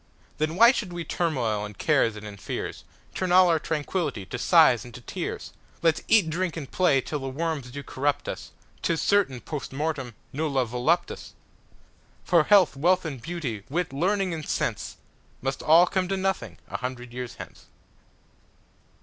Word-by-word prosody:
Then 155 +1 0
why 235 +5 +8
should 210 -8 -3
we 175 -1 -4
turmoil 125 -12 -1
in 105 -1 -7
cares 130 -6 +2
and 105 0 -9
in 105 -1 -8
fears, - - -5 0.3
Turn 185 -1 -2
all 185 0 +7
our 165 -2 +3
tranquill'ty 150 - -2
to - - -3
sighs 120 - +5
and 120 - -11
to 125 - -9
tears? 115 - -5 0.3
Let's 165 -1 +3
eat, 210 -7 +5
drink, 170 +2 -2
and 140 -5 -7
play 150 -8 +3
till 150 +3 -4
the 135 -1 -4
worms 150 -2 -3
do 140 +3 -7
corrupt 140 +2 -1
us,'Tis 165 -1 -5
certain, 190 -12 +2
Post 150 -3 -6
mortemNulla 140 -1 -2
voluptas. 125 +9 -1 0.9
For 170 -4 +4
health, 195 -8 +5
wealth 180 +6 +2
and 140 -6 -5
beauty, 145 -10 -4
wit, 165 0 -2
learning 185 +5 +1
and 155 -2 -6
sense, - - -2 0.4
Must 135 +1 -3
all 165 +3 +6
come 185 0 -1
to 195 +1 -1
nothing 190 0 -2
a - - -4
hundred 125 -1 -6
years 125 -1 -6
hence. - - -11
155 Hz, 165 wpm, -26 LUFS, 130-175 Hz, 0.9 s, why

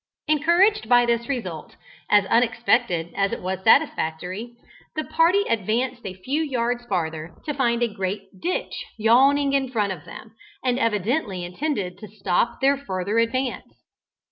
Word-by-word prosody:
Encouraged 345 +8 +3
by 245 -1 +6
this 235 +1 0
result, 185 - -4 0.3
as 205 -1 +5
unexpected 230 -6 +1
as 195 0 +1
it - - -3
was 185 +1 -4
satisfactory, 205 - +1 0.4
the 310 - -1
party 330 +6 +3
advanced 235 +4 -1
a 185 - -6
few 265 - -2
yards 245 -5 -1
farther, 160 -4 -3
to 300 - -2
find 240 -4 +1
a - - +3
great 195 +1 -3 0.2
ditch 365 - -2 0.2
yawning 275 +6 +4
in 270 -2 +1
front 210 -5 0
of 160 -5 -11
them, 220 0 -11 0.3
and 250 0 +1
evidently 210 - 0
intended 190 - -3
to 215 - -9
stop 205 +3 -1
their 275 +1 +4
farther 200 -3 -2
advance. 250 +3 -2
235 Hz, 145 wpm, -23 LUFS, 190-270 Hz, 0.4 s, by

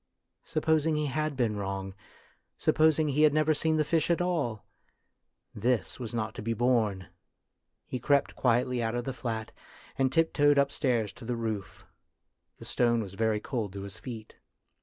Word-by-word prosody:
Supposing 160 0 +1
he 150 0 0
had 150 +1 -2
been 115 -5 +1
wrong, 95 -1 -4 0.6
supposing 155 -1 +3
he 145 +2 +1
had 155 -1 +5
never 155 0 +3
seen 160 +1 +1
the 155 - +2
fish 160 +1 +1
at 170 - +2
all? 160 - -1 0.9
This 120 +4 -1
was 115 -4 -5
not 110 -2 -2
to - - -7
be 115 +2 -1
borne. 110 - +1 0.8
He 125 - -4
crept 140 +3 +2
quietly 125 0 +1
out 115 +1 -1
of 120 - -1
the 135 - -4
flat, 115 -3 -4 0.5
and 130 -1 +3
tiptoed 145 -1 +3
up 140 0 +3
stairs 120 -7 0
to - - -13
the 120 +1 -2
roof. 110 -4 -4 0.7
The - - -11
stone 120 -2 +2
was 95 -2 -9
very 110 +1 +1
cold 110 -4 -3
to 100 -1 -6
his 100 -1 -8
feet. 115 -4 -9
125 Hz, 170 wpm, -29 LUFS, 110-145 Hz, 0.9 s, had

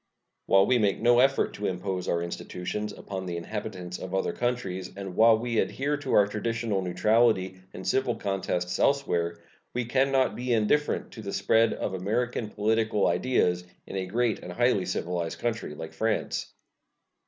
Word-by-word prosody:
While 95 0 +6
we 125 +2 +3
make 100 -3 +2
no 120 +1 +5
effort 135 +2 +3
to 100 - -3
impose 90 0 -3
our 85 0 0
institutions 90 +4 -4
upon 95 -2 -6
the 85 -1 -3
inhabitants 90 -1 -5
of 95 +1 -5
other 95 - 0
countries, 100 -7 -2
and 95 -2 -6
while 115 0 +6
we 115 0 -1
adhere 145 +2 0
to 145 -2 -3
our 100 - +6
traditional 110 0 -1
neutrality 95 0 +2
in 95 - -9
civil 130 -2 +1
contests 90 -2 -2
elsewhere, 85 -12 +1 0.4
we 125 -1 0
can 135 +3 +2
not 130 -1 +2
be 125 0 -1
indifferent 115 +7 +1
to 110 - -9
the 100 -2 -5
spread 115 0 +3
of 95 - -3
American 110 +4 -1
political 110 0 +1
ideas 90 -9 +2 0.2
in - - -8
a 95 -1 -2
great 115 +3 0
and - - -8
highly - - +2
civilized 85 -2 -2
country 115 -10 -3
like 80 +1 -7
France. 110 0 -1
105 Hz, 165 wpm, -27 LUFS, 95-120 Hz, 0.4 s, While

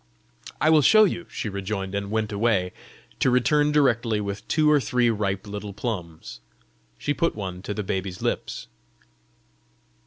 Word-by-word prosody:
"I 155 - +4
will 155 -1 +6
show 215 +8 +7
you," 175 -4 -1
she - - -4
rejoined, 100 -1 -4
and 100 0 -3
went 110 0 -1
away 100 -4 +1 0.5
to - - +3
return 145 +4 +3
directly 120 -7 +2
with 100 0 -5
two 155 -1 +2
or 150 - +5
three 125 -1 +1
ripe 100 -2 -2
little 105 0 -6
plums. 90 -7 -5 0.6
She 145 - -1
put 165 +3 0
one 95 -3 -5
to 100 +2 -4
the 105 - -3
baby's 95 -1 -3
lips. - - -3
105 Hz, 155 wpm, -25 LUFS, 100-130 Hz, 0.6 s, show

